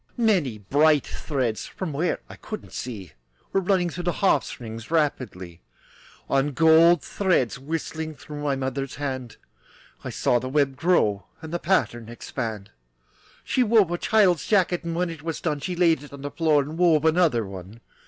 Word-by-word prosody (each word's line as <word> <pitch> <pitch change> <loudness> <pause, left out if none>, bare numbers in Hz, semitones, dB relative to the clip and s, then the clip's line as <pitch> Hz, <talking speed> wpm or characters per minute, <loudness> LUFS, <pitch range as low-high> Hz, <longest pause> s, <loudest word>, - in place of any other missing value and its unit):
Many 185 - +2
bright 145 +8 +3
threads, 130 -7 -3
From 180 -6 -5
where 160 +5 -1
I - - -11
couldn't 215 - -8
see, 105 -8 -6 0.4
Were 195 - +3
running 180 -2 +1
through 175 +1 -6
the 175 - +2
harp 190 -8 +2
strings 115 -1 -8
Rapidly, 125 - -2 0.7
And 140 0 +1
gold 160 +1 +6
threads 155 - 0
whistling 160 +2 -4
Through 150 +1 -9
my 145 -2 0
mother's 135 0 -3
hand. 130 -4 -5 0.7
I - - -4
saw 120 - +1
the 130 - -5
web 140 -1 +1
grow, 125 - +1
And 160 0 -9
the 175 - -1
pattern 120 - 0
expand. 115 -4 -5 0.7
She 255 - 0
wove 215 -6 +4
a 175 - 0
child's 195 -6 +3
jacket, 185 -4 +2
And 170 -1 -3
when 175 0 0
it 160 -2 -9
was 165 0 -4
done 150 -3 -2
She 180 +5 -4
laid 170 -3 +3
it 145 - -12
on 140 0 -9
the 145 - -4
floor 150 -1 +2
And 155 +4 -7
wove 160 -4 +4
another 160 -9 +3
one. 95 +3 -10
150 Hz, 175 wpm, -25 LUFS, 130-175 Hz, 0.7 s, gold